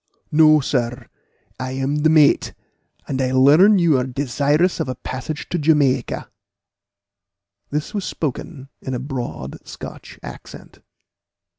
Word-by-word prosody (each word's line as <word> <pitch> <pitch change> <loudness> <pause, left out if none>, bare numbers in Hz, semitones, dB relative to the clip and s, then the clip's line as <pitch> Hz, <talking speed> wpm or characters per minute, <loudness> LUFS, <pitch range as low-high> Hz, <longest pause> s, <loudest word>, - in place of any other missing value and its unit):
"No, 155 0 +6
sir, 125 -2 -2 0.5
I 130 0 -4
am 135 +2 -1
the 155 +1 +3
mate, 155 -2 +4 0.5
and 135 -1 -2
I 130 -1 0
learn 155 +11 +6
you 165 -7 +3
are - - 0
desirous 145 +6 0
of - - -2
a 130 - -3
passage 135 +4 -6
to 175 - -1
Jamaica." 145 -5 +1 1.4
This 150 +8 -3
was 205 -2 -2
spoken 145 -3 -5
with 130 - -3
a - - -3
broad 125 - -6
Scotch - - -10
accent. - - -11
140 Hz, 130 wpm, -20 LUFS, 130-155 Hz, 1.4 s, No